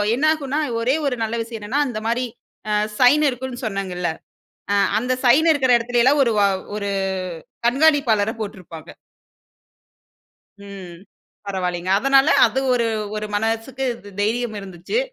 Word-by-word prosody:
என்னாகும்னா, 300 0 0 0.2
ஒரே 255 +4 +2
ஒரு 250 -3 -1
நல்ல 225 +1 -2
விஷயம் 225 0 -8
என்னன்னா 240 +8 -1
அந்த 235 -4 -4
மாரி 240 +2 0 0.5
அ - - +1 0.3
சைன் 270 +4 +5
இருக்குன்னு 255 0 -6
சொன்னேங்கல்ல, 190 -4 -3 0.6
அ - - +3 0.2
அந்த 250 +3 -1
சைன் 290 +7 +5
இருக்கிற 265 -4 +1
இடத்துலலாம் 245 +4 +2
1 230 - +1
வ - - +4 0.4
1 200 -1 -3 0.8
கண்காணிப்பாளரை 250 -6 +3
போட்டிருப்பாங்க. 180 -6 -8 1.7
ம், 195 -4 -10 0.5
பரவாயில்லைங்க. 180 -2 -2
அதனால 275 +3 +4 0.2
அது 240 +4 -2
ஒரு 235 -2 +1 0.3
ஒரு 215 0 -3
மனசுக்கு 225 +5 -2 0.2
த் 205 - -11
தைரியம் 225 +1 -1
இருந்துச்சு. 190 - -4
235 Hz, 125 wpm, -21 LUFS, 205-265 Hz, 1.7 s, சைன்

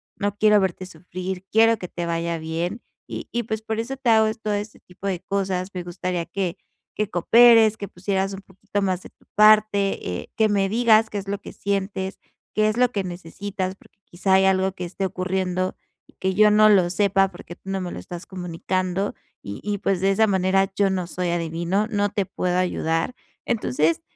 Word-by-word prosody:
no 205 0 -2
quiero 210 -1 +5
verte 185 0 -2
sufrir, 180 +2 -6
quiero 225 +1 +5
que 180 - -7
te 175 - -4
vaya 170 0 -1
bien, 170 +7 -3 0.3
y - - -6
y 240 - 0
pues 220 0 -3
por 220 0 -3
eso 260 +4 -5
te 250 -3 0
hago 220 -1 +5
todo 210 -1 -1
este 205 +1 -4
tipo 180 +2 -13
de 185 -3 -1
cosas. 190 -1 -2
Me 180 -1 -4
gustaría 175 0 -3
que 185 -3 -2 0.4
que 210 -1 -1
cooperes, 225 +3 +6
que 200 - -5
pusieras 195 +1 -2
un 195 - -7
poquito 200 +1 -5
más 185 -2 0
de - - -11
tu - - -31
parte, 210 -2 +5 0.2
eh, - - -14
que 220 -1 +4
me 200 -2 +1
digas 225 0 +4
qué 210 - -4
es 195 -1 -5
lo 200 0 -2
que - - -9
sientes, 195 -1 -3 0.4
qué 215 0 +3
es 215 - -2
lo 250 0 +4
que 200 -4 -1
necesitas, 185 +2 -5
porque 200 - -24
quizá 190 +2 -1
hay 190 0 +5
algo 190 0 +2
que 180 -2 -5
esté 190 +3 -3
ocurriendo, 185 0 -2 0.3
y - - -23
que 190 0 0
yo 210 0 +6
no 215 +1 +6
lo 190 -4 +5
sepa 195 0 +2
porque 175 -1 -11
tú 195 - -12
no 195 0 -1
me 180 - -4
lo - - -6
estás 175 0 -8
comunicando, 185 +1 -2 0.3
y 100 0 -6
y 205 0 -1
pues 195 -2 0
de 195 - +3
esa 220 +3 +4
manera 190 0 +2
yo 200 -1 +3
no 185 -2 -1
soy 180 0 -2
adivino, 170 +4 -1
no 205 -2 0
te 200 -1 -1
puedo 180 0 -1
ayudar". 165 +2 0 0.3
Entonces 165 - +1
195 Hz, 205 wpm, -23 LUFS, 180-210 Hz, 0.4 s, cooperes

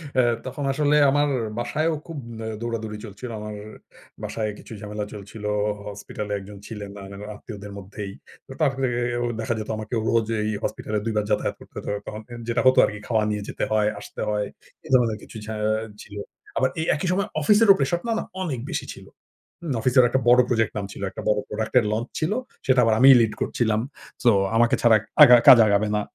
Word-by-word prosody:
অ্যা 130 - +4 0.2
তখন 135 +3 -5
আসলে 150 +1 +2 0.2
আমার 145 +1 +2 0.3
বাসায়ও 155 +7 0
খুব 165 - -7 0.3
আ - - -4
দৌড়াদৌড়ি 110 -2 -4
চলছিল। 110 +4 -8
আমার 105 0 -6 0.7
বাসায় 110 -1 -2
কিছু - - -11
ঝামেলা 105 0 -4
চলছিল। 105 +1 -10 0.4
হসপিটালে 105 0 -6
একজন 100 +1 -11
ছিলেন 105 -3 -7
না, - - -9
না - - -8 0.2
আত্মীয়দের 105 -1 -9
মধ্যেই। 100 +1 -7 0.4
তো - - -12
তার 155 -4 +3
থেকেও 120 -1 0 0.2
দেখা 115 +1 -1
যেত 110 - -6
আমাকে 110 +2 -5
রোজ 115 -2 +2
এই 105 - -1
হসপিটালে 105 -1 -2
২ 115 - -1
বার 105 - +1
যাতায়াত 105 - 0
করতে - - -17
হতো - - -7 0.2
তখন, 105 0 -6
অ্যা 120 -1 -9
যেটা 115 0 +1
হতো 130 - +5
আরকি 105 0 -5
খাওয়া 110 -2 +2
নিয়ে 105 -1 -2
যেতে - - -4
হয়, 105 -1 +3
আসতে - - -9
হয় 105 -1 0 0.4
এ - - -10
ধরনের 115 -4 +3
কিছু - - -10
ঝা 110 +1 -5 0.5
ছিলো, 100 0 -8 0.4
আবার 130 - +3
এই 160 - -1
একই 180 - -3
সময় 200 +3 0
অফিসেরও 210 +5 +6
প্রেশার 140 +5 +1
না, - - 0
না - - -3 0.2
অনেক 150 -9 -2
বেশি - - -3
ছিল। - - -13 0.6
হু, - - -10 0.2
অফিসেরও 130 -1 +5
একটা 130 +2 +1
বড় 125 +1 +7
প্রজেক্ট 115 -3 +1
নামছিল। 100 -1 -6
একটা - - -7
বড় 105 0 +2
প্রোডাক্ট 110 0 -3
এর 115 - -1
launch 115 +3 -3
ছিল। 160 +5 0 0.3
সেটা 130 -1 +4
আবার 115 -1 +3
আমিই 135 +1 +9
লিড 110 -2 +1
করছিলাম। 110 -2 0 0.4
সো 120 - +6 0.3
আমাকে 120 +3 +4
ছাড়া 115 -2 +6 0.3
আগা 125 - +9
কাজ 120 - +11
আগাবে 100 +1 +2
না। - - 0
115 Hz, 195 wpm, -24 LUFS, 105-130 Hz, 0.7 s, কাজ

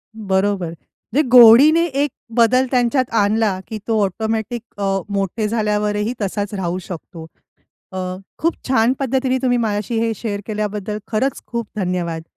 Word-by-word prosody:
बरोबर, 195 -3 0
म्हणजे 215 - -4
गोडीने 255 +7 +8
एक 285 -1 -1 0.3
बदल 250 +2 +4
त्यांच्यात 250 +1 +1
आणला, 205 -2 +2
की 220 - -5
तो 220 -2 +1
ऑटोमॅटिक 220 +3 -2 0.2
अ, 205 - -3 0.3
मोठे 200 +2 -1
झाल्यावर 210 -1 0
ही 210 +3 -1
तसाच 200 +1 -2
राहू 180 -3 -2
शकतो. 170 -1 -9 0.7
अ, 190 - -7 0.4
खूप 330 +1 +1
छान 250 -2 +3
पद्धतीने 260 -1 0
तुम्ही 245 -2 +2
माझ्याशी 220 0 -1
हे 230 0 0
शेअर 205 -2 -4
केल्याबद्दल 210 -1 -3
खरंच 255 +5 -1
खूप 235 -2 -4
धन्यवाद! 175 -4 -2
220 Hz, 140 wpm, -19 LUFS, 200-240 Hz, 0.7 s, गोडीने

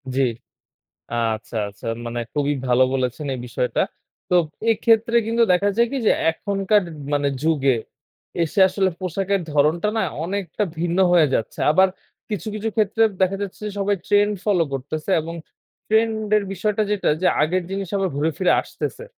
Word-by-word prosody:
জি, 135 - +2 1.1
আচ্ছা, 110 +2 -9
আচ্ছা 100 - -14 0.2
মানে 120 0 -3
খুবই 145 0 +1
ভালো 125 +1 +4
বলেছেন 130 +2 -2
এই - - -7
বিষয়টা। 125 +1 -1 0.5
তো 180 - +3 0.4
এক্ষেত্রে 225 +1 +2
কিন্তু 230 +1 +3
দেখা 180 +3 +3
যায় 235 0 +4
কি 275 - -1
যে, - - +7 0.2
এখনকার 200 +3 +1 0.3
মানে 145 0 +1
যুগে 145 -5 +2 0.7
এসে 165 +4 -2
আসলে 190 0 +1
পোশাকের 195 +2 -1
ধরণটা 150 +6 +2
না - - +2 0.2
অনেকটা 195 +2 -2 0.2
ভিন্ন 175 +1 -1
হয়ে 170 -4 +5
যাচ্ছে। 115 - -3
আবার 190 +5 +5 0.4
কিছু, 210 -2 -4
কিছু 215 +1 -2
ক্ষেত্রে 220 0 +2 0.2
দেখা 190 +1 +2
যাচ্ছে 200 -2 -5
যে, - - -4
সবাই 200 +1 +1
ট্রেন্ড 205 0 +3
ফলো 195 -5 +3
করতেছে 150 +6 -4
এবং 165 +2 -6 0.5
ট্রেন্ড 220 +1 +2 0.2
এর 210 - 0
বিষয়টা 210 +3 0
যেটা 205 -2 +1
যে, 185 - +3 0.2
আগের 180 +4 0
জিনিস 195 -1 -4
আবার 195 -1 0
ঘুরে 150 +3 +1
ফিরে 185 - +3
আসতেছে। - - -6
185 Hz, 160 wpm, -22 LUFS, 150-205 Hz, 1.1 s, যে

